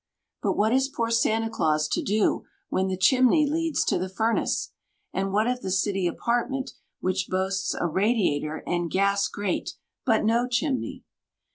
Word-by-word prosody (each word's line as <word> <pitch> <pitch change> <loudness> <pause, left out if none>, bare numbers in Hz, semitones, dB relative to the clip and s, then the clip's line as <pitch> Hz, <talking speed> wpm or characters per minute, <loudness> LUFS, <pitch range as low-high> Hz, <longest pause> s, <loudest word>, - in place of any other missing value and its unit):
But - - +1
what 215 +3 +2
is 265 +1 +2
poor 230 -5 -2
Santa 225 -1 +2
Claus 155 -8 +1
to - - 0
do 210 +1 +1 0.3
when 190 0 0
the 190 -1 -2
chimney 260 - +4
leads 325 +1 0
to - - +1
the 185 +1 -3
furnace? 225 +4 0 0.4
And 195 0 -1
what 210 +2 +2
of 250 +1 -1
the - - -4
city 190 0 +1
apartment, 245 +8 -1 0.3
which 185 0 -1
boasts 190 +1 -1
a - - 0
radiator 175 -5 0
and 175 -1 -1
gas 200 +3 +2
grate, 200 -2 -3 0.3
but - - +2
no 235 +3 +2
chimney? 260 +2 -2
205 Hz, 160 wpm, -26 LUFS, 185-245 Hz, 0.4 s, chimney